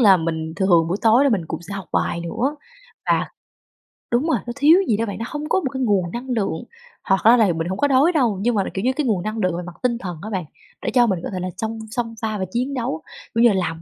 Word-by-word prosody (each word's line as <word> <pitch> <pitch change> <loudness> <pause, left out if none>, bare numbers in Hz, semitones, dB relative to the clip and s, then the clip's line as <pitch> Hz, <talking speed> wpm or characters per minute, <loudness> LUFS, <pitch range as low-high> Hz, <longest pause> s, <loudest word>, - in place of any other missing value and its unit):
là 200 -5 +7
mình 160 -1 -3
thường 175 -4 +3
buổi 180 - 0
tối 230 +5 +5
là 280 - +4
mình 190 -7 +1
cũng 165 +1 -5
sẽ 200 +4 -7
học 195 -3 -7
bài 170 - 0
nữa, 255 - -2 0.5
và - - +2 0.8
đúng 250 +7 +2
rồi, - - +3
nó 240 - -3
thiếu 300 +5 +6
gì 210 - +2
đó 230 - 0
bạn, 200 - -5
nó 225 - -3
hông 300 +1 -5
có 380 - +3
một 275 - -2
cái 265 - -3
nguồn 190 -6 +1
năng 250 +2 -6
lượng. 205 -9 -1 0.4
Hoặc 195 0 +2
ra 235 +3 +7
là 205 -7 +4
mình 165 +1 -2
hổng 190 +2 -3
có 285 - +2
đói 280 +6 +4
đâu, 245 - +1
nhưng 240 +1 +1
mà, 200 - +2
kiểu 190 - -3
như, 260 - +3
cái 295 0 -1
nguồn 200 -7 0
năng 215 +1 -3
lượng 185 -4 0
về 180 - -4
mặt 175 -1 -9
tinh 235 -2 +1
thần 180 -7 -6
á 215 - -6
bạn, 185 -6 -3 0.4
để - - -2
cho 240 -2 +5
mình 190 -4 0
có - - -3
thể 185 - -2
là 185 +1 -3
chông 225 0 -3
xông 230 -2 -3
pha 215 -1 -2
và 190 - -2
chiến 255 +4 -1
đấu. 235 - -2 0.3
Ví 230 - +4
dụ 240 - +8
như - - +2
là - - 0
làm 165 0 -6
215 Hz, 290 wpm, -21 LUFS, 180-245 Hz, 0.8 s, dụ